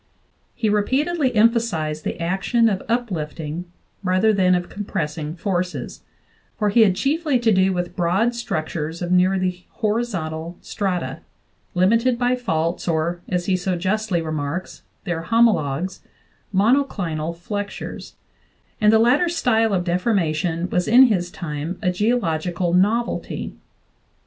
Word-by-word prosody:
He 230 -3 -1
re 210 0 +3
peatedly 275 +2 0
emphasized 210 -10 +2
the - - -3
action 195 +7 +2
of 195 -3 -2
uplifting 170 -8 -3 0.4
rather 185 +4 +3
than 185 -2 +3
of 175 0 -2
compressing 155 -6 -4
forces, 180 -1 -3 0.6
for 210 -1 +1
he 225 +3 +4
had 195 -4 +5
chiefly 295 - +1
to 235 -2 +2
do 190 -1 +3
with 175 -1 -3
broad 185 +6 +2
struc 235 -10 -3
tures 160 +2 -4
of 175 - -3
nearly 185 0 +1
horizontal 180 -8 -2
strata, 190 -3 -3 0.6
limited 230 +7 +3
by 245 +1 +2
faults 170 -9 -2
or, 170 +1 0
as 180 -1 -1
he 190 - +2
so 185 0 -1
justly 190 0 -1
remarks, 155 +3 -4 0.2
their 175 -5 -2
homologues, 185 -8 +2 0.5
monoclinal 195 - +1
flexures; 205 +3 -6 0.7
and 210 0 +6
the 220 - +6
latter 255 +10 +4
style 225 -9 +2
of 185 -3 +1
deformation 175 -3 0
was 180 0 +1
in 245 +4 +8
his 190 -8 +2
time 160 +1 -5
a 180 - +2
geological 180 -4 0
novelty. 215 +6 0
185 Hz, 130 wpm, -22 LUFS, 170-225 Hz, 0.7 s, in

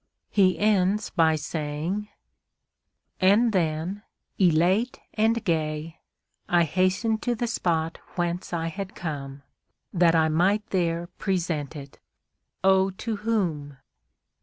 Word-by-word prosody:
He 190 -3 +3
ends 205 0 +2
by 160 -1 +3
saying: 155 +7 -3 1.1
And 210 +5 +4
then, 170 +2 -1 0.4
elate 185 +7 +3
and 225 +1 +1
gay, 160 -1 -2 0.5
I 175 -1 +4
hastened 185 +7 +1
to 245 -1 0
the 240 - -2
spot 165 -7 -1 0.2
whence 175 0 -2
I 165 -2 -2
had 195 +2 -6
come, 140 -4 -6 0.5
That 170 -2 +4
I 160 -1 +4
might 185 +7 +2
there 170 -2 0
present 165 -6 -2
it!—Oh! 190 +6 -2
to 215 +3 -4
whom? 175 -10 -2
180 Hz, 110 wpm, -26 LUFS, 160-200 Hz, 1.1 s, And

